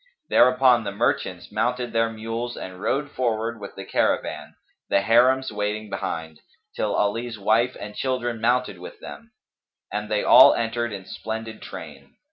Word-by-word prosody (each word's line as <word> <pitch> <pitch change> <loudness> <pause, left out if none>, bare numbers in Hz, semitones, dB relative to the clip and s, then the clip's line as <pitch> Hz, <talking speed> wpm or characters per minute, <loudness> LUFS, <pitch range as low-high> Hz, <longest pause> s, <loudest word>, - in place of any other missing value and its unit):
Thereupon 125 -1 +5
the 100 - -3
merchants 115 +5 -1
mounted 125 -1 -1
their 115 0 +2
mules 115 +2 -5
and 90 0 -8
rode 145 +5 -1
forward 115 -2 -1
with 100 -1 -9
the 95 - -8
caravan, - - -1 0.3
the 100 - +3
Harims 130 +4 +4
waiting 105 0 -3
behind, 80 -5 -4 0.4
till - - -1
Ali's 115 +3 -1
wife 115 +5 +1
and 105 - -7
children 120 -3 -2
mounted 120 -5 +1
with 90 - -10
them; - - -11 0.6
and 105 +1 -3
they 105 -1 0
all - - +8
entered 115 0 -1
in 95 -2 -7
splendid 110 +1 -6
train. - - -10
115 Hz, 150 wpm, -24 LUFS, 105-120 Hz, 0.6 s, all